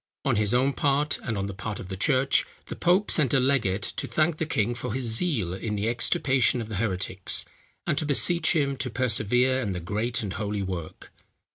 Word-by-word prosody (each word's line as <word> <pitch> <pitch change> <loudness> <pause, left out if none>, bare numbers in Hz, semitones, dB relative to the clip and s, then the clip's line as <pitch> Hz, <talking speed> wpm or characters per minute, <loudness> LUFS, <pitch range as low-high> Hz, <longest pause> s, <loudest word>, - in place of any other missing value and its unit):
On - - +2
his 105 -1 +1
own 135 +3 +2
part, 145 +1 +1
and 110 -4 -3
on 100 - -2
the 100 - -5
part 105 +2 -6
of - - -8
the 95 - -5
church, 130 +7 +3 0.3
the - - -5
pope 185 +4 +2
sent 145 -3 +3
a - - +5
legate 115 -8 +1
to - - -3
thank 155 0 +1
the 160 - -2
king 115 -5 0
for 120 -1 -5
his 130 - -2
zeal 115 - 0
in 105 +3 -4
the 105 +2 -2
extirpation 125 +1 +1
of 110 -2 -6
the 105 - -4
heretics, 95 -2 -1 0.4
and - - 0
to 155 - -2
beseech 170 +5 +4
him 140 -3 0
to 130 - -3
persevere 125 +2 +1
in 105 -6 -2
the 90 - -4
great 110 +7 -2
and 100 -3 -4
holy 105 -1 -3
work. 90 -4 -7
120 Hz, 215 wpm, -26 LUFS, 100-135 Hz, 0.4 s, a